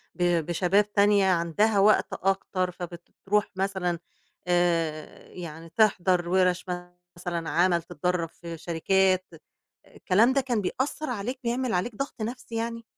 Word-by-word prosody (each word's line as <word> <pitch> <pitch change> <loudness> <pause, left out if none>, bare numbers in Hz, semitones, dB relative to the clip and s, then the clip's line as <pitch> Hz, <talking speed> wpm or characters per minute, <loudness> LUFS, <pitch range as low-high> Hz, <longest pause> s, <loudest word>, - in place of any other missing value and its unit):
ب 175 -3 +1
بشباب 195 +4 +1
تانية 200 -1 +4
عندها 190 +5 +2
وقت 210 +2 +4
أكتر 190 -1 -1
فبترُوح 180 +4 -3
مثلًا 185 -3 -1 0.5
آآ 170 -3 0
يعني 165 -2 -8
تحضَر 180 -3 +2
وِرش 185 0 +2 0.5
مثلًا 170 -2 -3
عمل، 175 0 +3
تتدرّب 175 0 -2
في 170 -1 -9
شركات، 185 +3 +1 0.7
الكلام 225 +8 +3
ده 275 - +3
كان 245 -5 -1
بيأثّر 260 +9 -2
عليك، 245 +3 -3
بيعمل 240 0 -1
عليك 195 +5 -1
ضغط 275 -3 -5
نَفْسي 235 +1 -5
يعني؟ 230 0 -3
185 Hz, 125 wpm, -27 LUFS, 175-210 Hz, 0.7 s, تانية